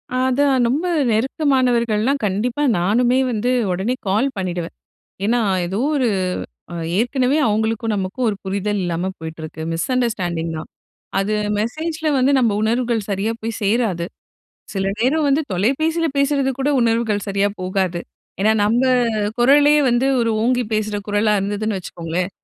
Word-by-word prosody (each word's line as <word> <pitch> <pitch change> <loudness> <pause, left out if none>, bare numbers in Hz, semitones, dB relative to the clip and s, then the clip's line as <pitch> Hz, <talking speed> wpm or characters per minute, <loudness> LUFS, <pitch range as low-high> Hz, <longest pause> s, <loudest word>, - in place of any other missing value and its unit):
அதான் 260 0 +2
ரொம்ப 295 +8 0 0.3
நெருக்கமானவர்கள்லாம், 250 -1 +1
கண்டிப்பா 230 +8 -1 0.2
நானுமே 240 +8 +2
வந்து 230 +2 -1 0.2
உடனே 195 +8 -1
கால் 215 +8 +2
பண்ணிடுவேன். 175 -2 -3 0.5
ஏன்னா, 240 +3 +2 0.3
ஏதோ 190 +5 -3 0.2
ஒரு 255 -3 +2 0.9
ஏற்கனவே 255 +4 +1
அவங்களுக்கும், 220 +1 0
நமக்கும் 195 +6 -2
ஒரு 205 - -2
புரிதல் 200 +1 -1
இல்லாம 175 +1 -2
போயிட்டிருக்கு 160 0 -7
மிஸ் 165 0 -2
அண்டர்ஸ்டாண்டிங் 180 -9 -1
தான். 155 - -8 0.5
அது 195 +2 0 0.3
மெசேஜ்ல 315 +7 -2
வந்து 260 +2 +3
நம்ம 240 -3 +3
உணர்வுகள் 230 -1 0
சரியா 200 +3 0
போய் 225 0 -4
சேராது. 200 -5 +1 0.7
சில 195 -1 -1
நேரம் 285 +6 +2
வந்து 280 +3 +3
தொலைபேசில 315 - +1
பேசுறது 280 -1 +2
கூட 275 +2 0
உணர்வுகள் 225 -3 +1
சரியா 200 +1 +1
போகாது. 185 -1 -1 0.4
ஏன்னா 215 +2 +4
நம்ம 230 +4 +2 0.6
குரலே 285 +4 +5
வந்து 240 +2 +2
ஒரு 230 -1 +1
ஓங்கி 250 +1 +2
பேசுகிற 215 -1 -1
குரலா 205 +1 +2
இருந்ததுன்னு 205 +2 -2
வச்சுக்கோங்களேன். 175 +1 -4
220 Hz, 130 wpm, -20 LUFS, 195-255 Hz, 0.9 s, குரலே